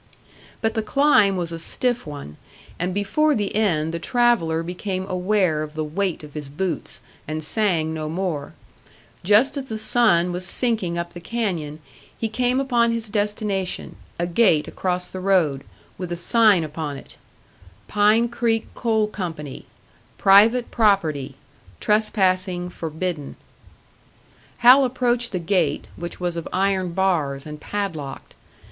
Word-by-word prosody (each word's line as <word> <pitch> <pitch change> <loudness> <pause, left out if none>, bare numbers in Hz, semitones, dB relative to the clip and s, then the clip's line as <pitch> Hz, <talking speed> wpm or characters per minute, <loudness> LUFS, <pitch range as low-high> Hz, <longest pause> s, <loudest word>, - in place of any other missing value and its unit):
But 225 0 +1
the 225 - 0
climb 220 -5 +3
was 170 -2 -3
a 165 - -5
stiff 245 +3 -1
one, 140 - -8 0.4
and 180 +2 -1
before 205 +11 +1
the 205 -2 -2
end 165 -7 +1
the 170 - -3
traveller 170 -7 +2
became 185 +2 -4
aware 185 -4 +1
of 155 0 -6
the 155 - -2
weight 170 +2 -2
of 150 -1 -11
his 150 -3 -6
boots, 165 +2 -3 0.3
and 155 +1 -3
sang 165 -3 +1
no 155 -1 -4
more. 165 -4 -3 0.7
Just 210 +10 +4
as 275 - -4
the 220 -4 -5
sun 215 -6 +3
was 180 +1 -4
sinking 190 -3 0
up 170 0 -4
the 175 - -8
canyon, 170 -7 -3 0.4
he 225 - -2
came 250 +3 +1
upon 240 -4 +2
his 230 -1 -2
destination 205 -2 -2 0.2
a 175 - 0
gate 175 -4 +3
across 180 -1 -2
the 185 - -7
road, 175 -8 +2 0.4
with 180 -2 -5
a - - -1
sign 205 0 +4
upon 150 -2 -5
it: - - -13 0.7
PINE 210 +3 +3
CREEK 230 -1 -1
COAL 220 -3 +1
CO. 185 -6 -4 0.8
PRIVATE 220 +5 +5
PROPERTY 160 - +1 0.4
TRESPASSING 185 -4 +1
FORBIDDEN 160 -2 -4 1.2
Hal 250 +3 +7
approached 245 -1 0
the 185 - -2
gate, 170 -4 0
which 175 0 -7
was 175 -1 -2
of 170 - -4
iron 190 -2 0
bars, 160 -8 0
and 150 -1 -8
padlocked. 165 -10 -5
185 Hz, 140 wpm, -22 LUFS, 165-220 Hz, 1.2 s, Hal